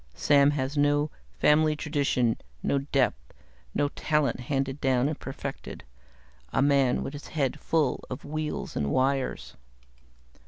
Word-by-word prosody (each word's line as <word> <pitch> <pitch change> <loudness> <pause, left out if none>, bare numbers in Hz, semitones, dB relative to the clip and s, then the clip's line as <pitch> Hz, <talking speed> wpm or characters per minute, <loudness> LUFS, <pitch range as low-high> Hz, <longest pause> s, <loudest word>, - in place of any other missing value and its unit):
Sam 140 -1 +4
has 135 +2 -2
no 145 +1 +2 0.3
family 155 +1 +4
tradition, 140 -6 0 0.3
no 140 - +1
depth, 135 - -1 0.4
no 145 - +2
talent 150 -5 0
handed 135 +2 -2
down 130 -1 +2
and 150 0 -3
perfected. 135 0 -7 0.7
A - - 0
man 140 -2 +3
with 140 - -5
his 145 - -8
head 140 -5 -1
full 155 -6 0
of 130 - -6
wheels 155 +1 -4
and 70 -1 0
wires." 135 - 0
140 Hz, 130 wpm, -27 LUFS, 130-150 Hz, 0.7 s, Sam